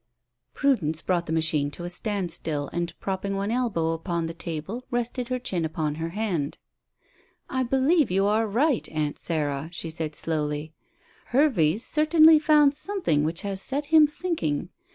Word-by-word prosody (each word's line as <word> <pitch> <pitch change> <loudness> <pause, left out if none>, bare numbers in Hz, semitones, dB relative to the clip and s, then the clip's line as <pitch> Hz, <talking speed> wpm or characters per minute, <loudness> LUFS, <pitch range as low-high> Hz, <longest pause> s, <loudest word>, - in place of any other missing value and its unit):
'" 120 +1 -54
Prudence 195 - +1
brought 175 0 -1
the - - -4
machine 160 -3 +1
to 160 +4 -9
a 175 - -4
standstill, 175 -8 -3
and 170 -1 -3
propping 195 +1 -3
one 200 +2 -2
elbow 225 -10 0
upon 165 0 -2
the 165 - -4
table 170 +8 -5
rested 245 0 -2
her 255 0 -1
chin 190 -9 -2
upon 155 -2 -2
her 165 - -2
hand. 175 -7 -2 0.9
"I 260 - 0
believe 270 +4 +2
you 195 +2 +2
are 215 +2 +2
right, 250 +5 +1
Aunt 150 -2 -2
Sarah," 150 -2 -2
she 165 -1 -5
said 160 -1 -4
slowly. 150 0 -2 0.5
"Hervey's 230 - +2
certainly 310 +1 +6
found 300 -2 +5
something 305 - 0
which 165 +2 -2
has 195 -1 -3
set 280 +6 +1
him 310 -1 +8
thinking. 290 - -2
185 Hz, 160 wpm, -26 LUFS, 160-255 Hz, 0.9 s, him